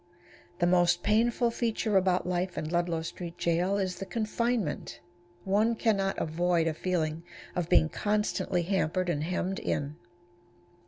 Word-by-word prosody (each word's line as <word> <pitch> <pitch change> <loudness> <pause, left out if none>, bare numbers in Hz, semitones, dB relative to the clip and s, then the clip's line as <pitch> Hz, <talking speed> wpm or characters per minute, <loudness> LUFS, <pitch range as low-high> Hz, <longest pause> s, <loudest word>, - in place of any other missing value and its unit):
The 175 - +2
most 175 0 +3
painful 235 +2 +2
feature 225 -2 -1
about 185 -1 +3
life 180 0 -2
in 155 - -2
Ludlow 170 -1 0
Street 170 +1 -7
Jail 175 +4 +1
is 190 -2 -2
the 195 - -5
confinement. 230 -4 -2 0.4
One 215 +4 +2
can 220 -2 +2
not 195 0 -1
avoid 170 +1 +1
a 165 - 0
feeling 160 -2 -1 0.3
of 175 -2 -2
being 80 -2 +5
constantly 205 - 0
hampered 185 -1 0
and 150 -3 0
hemmed 180 +3 -2
in. 145 +2 -2
180 Hz, 145 wpm, -29 LUFS, 170-205 Hz, 0.4 s, being